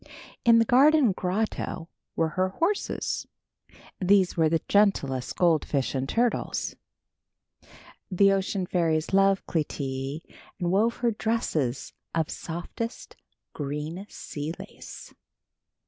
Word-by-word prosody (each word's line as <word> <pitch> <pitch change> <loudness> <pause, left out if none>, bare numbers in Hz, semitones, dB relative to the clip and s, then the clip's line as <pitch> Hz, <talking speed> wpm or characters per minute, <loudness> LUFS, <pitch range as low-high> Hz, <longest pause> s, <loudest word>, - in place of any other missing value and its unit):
In 230 -1 +6
the 230 - +4
garden 275 0 +5
grotto 185 -2 -2 0.3
were 165 -1 +1
her 185 +4 0
horses. 340 - -1 0.7
These 190 -1 +3
were 160 -2 +3
the 165 0 0
gentlest 140 -11 +2
goldfish 155 -5 +1
and 135 0 -2
turtles. 240 0 0 1.3
The 195 +1 +4
ocean 195 -1 0
fairies 165 -2 0
loved 195 0 +4
Clytie 140 -2 -3 0.4
and 175 -2 0
wove 220 +5 +2
her 235 - +4
dresses 165 - -1 0.2
of 160 -2 0
softest 175 +8 -6 0.4
green 150 +6 -4
sea 150 +1 -6
lace. - - -11
180 Hz, 105 wpm, -27 LUFS, 155-210 Hz, 1.3 s, In